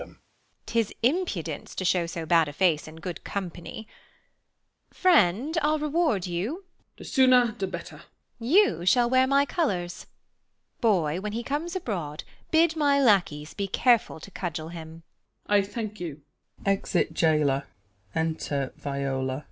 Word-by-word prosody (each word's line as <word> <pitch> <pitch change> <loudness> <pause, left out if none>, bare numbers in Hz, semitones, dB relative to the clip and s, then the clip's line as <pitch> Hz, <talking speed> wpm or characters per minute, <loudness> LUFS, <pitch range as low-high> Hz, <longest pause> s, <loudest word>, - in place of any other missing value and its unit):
'Tis 225 -2 0
impudence 235 - -1
to 185 - -3
shew 180 -2 +2
so 170 -1 -5
bad 165 -1 +4
a 145 - -6
face 160 -2 +2
In 155 - -10
good 160 +1 -7
company 190 +3 -6 1.0
Friend, 300 - +3
I'll 305 +1 +2
reward 300 - 0
you. 200 - -3
Jail. 370 - -43
The - - -11
sooner 255 -3 +4
the 195 -2 -4
better. - - -8 0.4
Beat. 230 - -6
You 360 - +4
shall 240 +3 +5
wear 260 +1 +4
my 280 +1 +4
colours; 190 - -2 0.7
Boy, 180 -7 +1
when 210 +1 -4
he 235 +2 -3
comes 305 +8 -3
abroad 175 - -4 0.3
Bid 325 0 +3
my 285 -2 +3
lacquies 175 - +2
be 200 -1 -3
careful 235 -4 +2
to 195 - -11
cudgel 165 -4 -4
him. 165 -1 -9
210 Hz, 120 wpm, -26 LUFS, 170-280 Hz, 1.0 s, shall